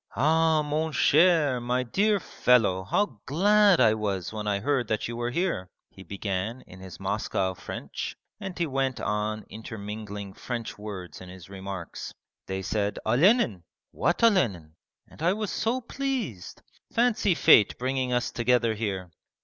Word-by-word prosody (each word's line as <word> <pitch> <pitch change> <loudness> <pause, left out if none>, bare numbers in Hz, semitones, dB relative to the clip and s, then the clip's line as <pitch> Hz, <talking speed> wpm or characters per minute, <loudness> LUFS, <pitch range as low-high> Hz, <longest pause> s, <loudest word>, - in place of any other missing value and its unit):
'Ah, 160 +1 +3
mon 155 +2 -1
cher, 155 -5 +4
my 125 +1 0
dear 205 - +2
fellow, 115 - +2
how 130 - 0
glad 200 +5 +4
I 110 - +5
was 100 -4 -3
when 105 -1 -4
I 100 -1 +1
heard 130 +1 0
that 110 0 -1
you 120 - -5
were 120 0 -2
here!' 145 - -1 0.2
he 95 - -14
began 100 +5 -4
in 95 - -14
his 95 -1 -10
Moscow 95 -1 -1
French, - - -6 0.2
and 195 -3 -6
he 170 - +1
went 135 -3 -1
on 105 +1 -2
intermingling 105 -2 -7
French 120 +1 -5
words 95 -6 -8
in 90 - -10
his 95 0 -12
remarks. 95 -3 -7 0.3
'They 95 0 -3
said, 105 0 -1
"Olenin". 160 - +3 0.3
What 175 +6 0
Olenin? 105 - +2 0.3
and - - -16
I 175 +3 +3
was 215 -1 -3
so 240 +4 -1
pleased.... 245 - -4 0.3
Fancy 225 -6 +2
fate 135 -11 +6
bringing 130 0 -1
us 125 0 0
together 120 -1 +2
here! 95 -5 -4
120 Hz, 150 wpm, -27 LUFS, 100-160 Hz, 0.3 s, fate